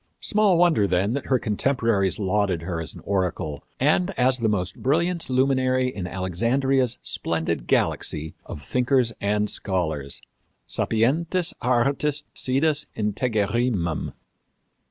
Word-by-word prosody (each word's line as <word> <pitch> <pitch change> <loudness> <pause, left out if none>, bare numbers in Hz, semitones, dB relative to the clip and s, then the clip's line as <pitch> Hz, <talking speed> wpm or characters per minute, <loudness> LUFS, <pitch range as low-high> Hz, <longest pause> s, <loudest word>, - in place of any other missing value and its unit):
Small 205 -4 +2
wonder, 165 - +4
then, 95 +4 +1
that 140 - -3
her 130 - +3
contemporaries 110 -4 +1
lauded 95 -4 0
her 85 -1 -3
as 80 - -7
an - - -10
oracle 90 -6 -2 0.2
and 155 +7 +3
as 130 0 +3
the 115 -2 +1
most 95 -4 -2
brilliant 170 +5 0
luminary 130 -1 +2
in 95 -7 -5
Alexandria's 120 +8 0
splendid 80 0 -2
galaxy 80 +1 0
of 75 - -8
thinkers 125 -2 +2
and 105 +1 +1
scholars 80 -10 -2 0.5
sapientis 160 +10 +1
artis 135 +4 +1
sidus 145 +3 0
integerrimum. 105 - 0
115 Hz, 115 wpm, -24 LUFS, 95-135 Hz, 0.5 s, wonder